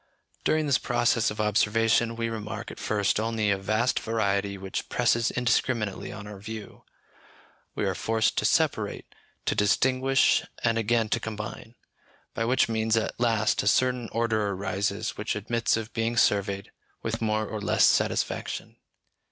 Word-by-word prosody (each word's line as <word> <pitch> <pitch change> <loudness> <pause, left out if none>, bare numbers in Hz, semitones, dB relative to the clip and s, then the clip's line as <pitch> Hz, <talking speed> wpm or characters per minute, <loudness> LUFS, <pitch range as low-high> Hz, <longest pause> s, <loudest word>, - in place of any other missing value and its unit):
During 155 0 +2
this 140 -2 +2
process 120 -1 +2
of 105 - -7
observation 115 +2 +2
we 115 0 -2
remark 110 0 -5
at - - -11
first 105 -1 0
only 110 -2 0
a 100 - +2
vast 110 +5 +1
variety 100 -3 -1
which 95 0 -5
presses 120 -1 +2
indiscriminately 120 -3 0
on 105 -1 -8
our 105 -1 -9
view; 110 +1 -9 0.9
we - - -1
are - - 0
forced 110 -1 0
to - - -2
separate, - - 0 0.3
to - - +1
distinguish, 130 +5 +3 0.2
and 115 -1 +2
again 115 0 +1
to 115 - +1
combine; 110 +1 -7 0.6
by 115 - -1
which 130 +3 +3
means 110 0 +1
at 110 - -2
last 115 -3 +2
a - - -3
certain 125 +1 +2
order 110 -2 0
arises 100 +2 -2
which 105 - -2
admits 115 +3 0
of 115 +1 -6
being 115 +1 -1
surveyed 100 -3 +1 0.3
with 115 +1 -3
more 110 -1 0
or 105 0 -5
less 100 - +3
satisfaction. - - 0
110 Hz, 150 wpm, -27 LUFS, 105-115 Hz, 0.9 s, distinguish